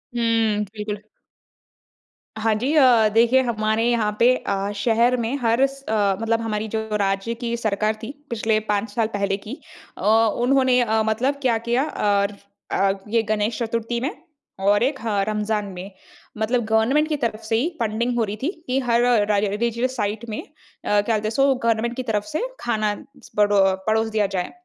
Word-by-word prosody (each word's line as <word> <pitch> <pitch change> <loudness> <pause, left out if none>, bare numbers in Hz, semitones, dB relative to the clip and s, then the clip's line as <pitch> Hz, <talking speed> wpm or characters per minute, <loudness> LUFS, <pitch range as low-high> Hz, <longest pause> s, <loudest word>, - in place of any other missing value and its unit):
हुँ। 225 -3 +1
बिल्कुल। 210 -1 -5 1.4
हाँ, 220 0 +2
जी। 255 +8 -1
अ, 245 -7 +6
देखिए 235 +3 +5
हमारे 220 -2 0
यहाँ 215 -3 0
पे 250 +2 +5
अ, 200 -2 -2
शहर 235 +4 +2
में 235 +3 -1
हर 235 +3 +3
स 275 0 -13
अ, 205 -3 +2
मतलब 225 0 0
हमारी 220 -1 -2
जो 220 +1 -2 0.2
राज्य 195 +3 -1
की 235 -1 -1
सरकार 215 -1 0
थी, 240 - -5 0.2
पिछले 220 -1 +1
पाँच 210 +1 0
साल 225 0 +1
पहले 200 -1 0
की, 210 +4 -9 0.4
अ, - - -9 0.4
उन्होंने 260 -1 +3
अ, 220 -1 +1
मतलब 255 +6 +1
क्या 245 -4 +2
किया 245 +3 +2
और 205 -6 0 0.4
अ, 195 0 +2 0.2
ये 230 +1 +2
गणेश 215 +2 -1
चतुर्थी 230 +1 -2
में 275 +7 -1 0.5
और 205 +3 +3
एक 270 +1 0
ह 210 -3 0
रमज़ान 210 0 -1
में। 185 +3 -8 0.5
मतलब 235 +3 0
गवर्नमेंट 225 +8 +2
की 305 - +1
तरफ 230 -5 -2
से 220 +1 -1
ही 265 +10 +1
फंडिंग 235 +2 -1
हो 230 - +2
रही 210 0 -3
थी 305 - +1 0.2
कि 255 +1 +1
हर 240 -2 +2
राइ 240 -4 +3
राइ 205 0 +2
रिलिजियस 235 +5 -1
साइट 210 +2 -2
में 215 - -4
अ, - - -16 0.4
क्या 205 0 +3
बोलते 215 0 -1
हैं - - 0
सो 275 +3 +3
गवर्नमेंट 230 -1 0
की 255 - -3
तरफ 215 -4 -1
से 310 - -1 0.2
खाना 215 -3 0 0.3
स - - -15
बड़ो 205 -1 +4 0.3
पड़ोस 220 +1 +2
दिया 210 - +3
जाए। 180 - -2
225 Hz, 185 wpm, -22 LUFS, 210-240 Hz, 1.4 s, अ